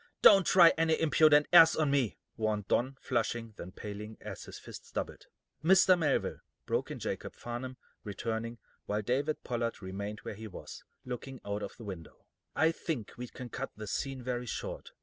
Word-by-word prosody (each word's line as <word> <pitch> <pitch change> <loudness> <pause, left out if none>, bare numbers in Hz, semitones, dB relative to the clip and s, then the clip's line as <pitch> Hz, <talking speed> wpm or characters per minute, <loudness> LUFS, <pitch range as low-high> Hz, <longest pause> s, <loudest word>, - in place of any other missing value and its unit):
"Don't 195 -3 +8
try 175 -3 +8
any 160 -1 +3
impudent 155 -2 +5
airs 165 -2 +9
on 155 -3 +1
me," 135 -6 +1 0.2
warned 105 -2 -1
Don, 130 +3 +1
flushing, 115 -2 -1
then 90 - -8
paling, 105 +2 -7
as - - -8
his - - -9
fists - - -11
doubled. - - -5 0.4
"Mr. 185 +2 +6
Melville," 165 -4 0 0.3
broke - - -1
in - - -5
Jacob - - -4
Farnum, 125 +2 -6 0.3
returning, 115 +3 -3 0.3
while 105 +1 -1
David 140 +7 0
Pollard 115 -1 -2
remained 100 +2 -5
where - - -6
he 110 +2 -8
was, 100 - -9 0.2
looking 130 +1 -6
out 100 +1 -2
of - - -6
the 115 - -10
window, 95 -6 -9 0.3
"I 160 +1 +4
think 155 - -4
we 125 0 -6
can 125 +1 -9
cut 135 +3 -5
this 110 -1 -6
scene 135 -2 -3
very 125 0 -3
short. - - -5
120 Hz, 175 wpm, -31 LUFS, 105-145 Hz, 0.4 s, airs